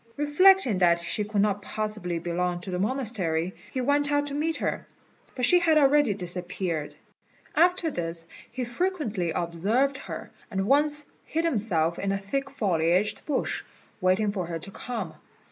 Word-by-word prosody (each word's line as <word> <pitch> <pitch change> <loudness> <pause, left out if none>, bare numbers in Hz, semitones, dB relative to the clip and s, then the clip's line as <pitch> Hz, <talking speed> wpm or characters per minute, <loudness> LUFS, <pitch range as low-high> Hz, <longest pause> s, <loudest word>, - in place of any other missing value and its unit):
Reflecting 295 - +4
that 170 -2 +5
she 170 +5 -2
could 205 -1 +1
not 205 -1 0
possibly 210 -4 -3
belong 175 +1 -2
to 185 - -6
the 180 - -2
monastery, 195 -7 -1 0.2
he 260 - -2
went 285 +3 +1
out 290 0 +2
to 285 - +1
meet 315 +3 -1
her, - - -3 0.5
but 250 - +1
she 355 +8 +6
had 325 -3 +3
already 285 -6 +4
disappeared. 180 -3 -3 0.6
After 345 0 +3
this 165 -5 -3 0.3
he 250 +2 -3
frequently 240 - -1
observed 205 +13 0
her, - - -7 0.2
and 195 -3 -1
once 295 +4 +4 0.2
hid 325 +2 -2
himself 185 - +1
in 195 - -1
a 195 - 0
thick 275 +8 -3
foliaged 185 -5 +1
bush, 290 -4 -1 0.4
waiting 185 +3 +2
for 185 -4 -3
her 170 -1 -3
to 185 +5 -8
come. 215 -8 -5
210 Hz, 160 wpm, -27 LUFS, 180-280 Hz, 0.6 s, she